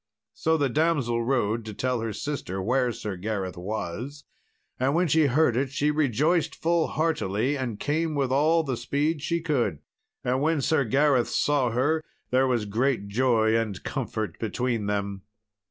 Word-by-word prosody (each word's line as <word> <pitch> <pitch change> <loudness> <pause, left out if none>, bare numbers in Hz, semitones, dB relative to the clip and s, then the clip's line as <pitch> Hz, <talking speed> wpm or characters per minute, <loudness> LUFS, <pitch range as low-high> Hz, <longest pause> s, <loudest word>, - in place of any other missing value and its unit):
So 160 0 +1
the 145 -2 +2
damsel 135 -5 +1
rode 115 -3 0
to 110 -2 -7
tell 125 +1 -1
her 115 -1 -2
sister 105 -7 -4
where 125 +5 +1
Sir 105 -3 -5
Gareth 95 -2 -3
was, 110 +9 -5 0.6
and 135 +3 +1
when 175 +1 +3
she 155 0 +4
heard 135 -2 +3
it 135 +2 0
she 145 +3 +1
rejoiced 150 +3 +1
full 170 0 +1
heartily 145 - 0
and 125 -6 -4
came 155 +1 -1
with 135 -3 0
all 155 +5 +3
the 130 -5 -2
speed 145 +6 -1
she 170 +3 -1
could. 125 - 0 0.5
And 130 +2 0
when 160 +1 +2
Sir 140 0 +2
Gareth 135 0 +3
saw 145 -4 +2
her, 145 +7 +1 0.3
there 130 +1 +3
was 120 -4 0
great 110 0 0
joy 115 -1 +2
and 110 -4 -1
comfort 110 - -4
between 115 -1 -1
them. 100 -1 -2
130 Hz, 165 wpm, -26 LUFS, 110-150 Hz, 0.6 s, she